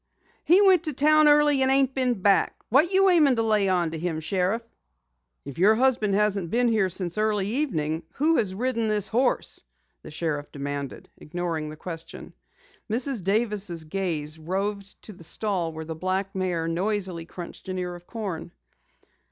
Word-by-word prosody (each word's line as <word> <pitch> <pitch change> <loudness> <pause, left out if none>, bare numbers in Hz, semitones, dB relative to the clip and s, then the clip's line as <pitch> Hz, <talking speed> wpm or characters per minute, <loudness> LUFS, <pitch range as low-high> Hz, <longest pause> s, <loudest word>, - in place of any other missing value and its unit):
"He 370 +5 +6
went 370 -4 +5
to 305 - -2
town 305 +3 +5
early 295 -2 +5
and 265 - +3
ain't 270 -1 +3
been 250 -7 0
back. 200 -1 +2
What 300 - +4
you 390 0 +4
aimin' 300 -7 +5
to 225 - 0
lay 210 -3 +2
onto 170 -3 0
him, 165 -1 -2
Sheriff?" 190 +7 -1 0.8
"If 140 +2 -8
your 210 +4 +5
husband 235 -5 +2
hasn't 200 -4 +1
been 240 +4 +2
here 215 -4 +2
since 180 +1 -3
early 210 -2 +1
evening, 165 - -1
who 315 +4 +2
has 190 -5 -1
ridden 230 0 -1
this 210 -2 0
horse?" 245 +5 0 0.4
the - - -11
sheriff 150 -2 -3
demanded, 140 -1 -5
ignoring 165 -1 -4
the 155 - -9
question. 165 0 -8 0.6
Mrs. 245 -2 -1
Davis' 200 -4 0
gaze 160 -3 -3
roved 195 +4 -4
to 215 - -9
the 175 - -15
stall 180 -2 -2
where 160 0 -7
the 160 - -5
black 185 +3 -2
mare 180 -3 -1
noisily 185 -1 -2
crunched 175 +2 -9
an 185 - -3
ear 180 -1 -3
of 175 0 -12
corn. 200 -8 -5
195 Hz, 170 wpm, -25 LUFS, 170-240 Hz, 0.8 s, He